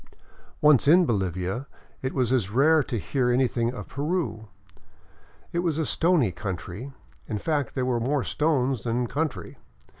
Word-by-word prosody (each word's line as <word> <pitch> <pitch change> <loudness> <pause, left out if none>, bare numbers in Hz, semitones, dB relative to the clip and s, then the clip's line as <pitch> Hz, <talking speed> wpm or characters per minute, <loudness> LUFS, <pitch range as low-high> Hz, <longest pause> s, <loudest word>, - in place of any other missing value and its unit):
Once 150 -3 +5
in 175 +4 +6
Bolivia 95 - -2 0.3
it 130 - -3
was 130 -2 +1
as 115 -7 +1
rare 150 +8 +4
to 125 -3 -3
hear 125 +3 0
anything 120 -1 +1
of 105 -6 -8
Peru. 145 -7 -2 1.1
It 170 - 0
was 170 -4 0
a 160 - 0
stony 165 - +2
country, 90 - -6 0.4
in 110 - -2
fact 145 +2 -2
there 130 - 0
were 125 -2 0
more 135 +3 0
stones 135 -6 0
than 120 +1 -1
country. 150 +4 -3
130 Hz, 150 wpm, -26 LUFS, 115-150 Hz, 1.1 s, in